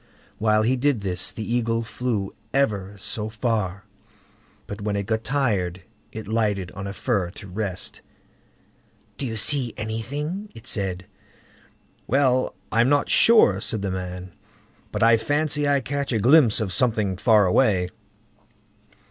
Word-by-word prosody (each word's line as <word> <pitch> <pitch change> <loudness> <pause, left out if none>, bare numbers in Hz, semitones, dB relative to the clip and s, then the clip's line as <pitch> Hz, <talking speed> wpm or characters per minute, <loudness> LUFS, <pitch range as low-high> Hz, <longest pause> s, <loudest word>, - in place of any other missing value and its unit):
While 110 0 +3
he 125 +4 +2
did 130 -3 +1
this, 90 -2 0
the 110 - -6
Eagle 115 -1 0
flew 110 -4 -3 0.2
ever 105 -8 0
so 105 +2 -3
far, 110 -4 -2 0.8
but 100 +1 -7
when 105 0 -2
it 100 -1 -2
got 110 +2 -1
tired, 100 -10 -1 0.3
it 110 -2 -8
lighted 105 -4 -1
on 100 0 -7
a - - -4
fir 100 -3 -1
to 100 - -10
rest. 95 -1 -4 1.2
"Do 135 - -2
you 110 - -4
see 125 +1 +1
anything?" 145 - -4
it 115 0 -12
said. 95 -5 -2 1.0
"Well! 130 -1 +2 0.2
I'm 115 +3 +3
not 145 0 +2
sure", 105 - +5
said 110 -2 -2
the 95 - -1
man; 90 0 -5 0.6
"but - - -1
I 115 0 +6
fancy 145 +4 0
I 140 -1 +2
catch 140 0 -3
a 115 - +1
glimpse 125 +1 +5
of 100 -5 -2
something 110 -6 +1
far 105 +1 +4
away." 95 -2 +2
110 Hz, 145 wpm, -24 LUFS, 100-130 Hz, 1.2 s, I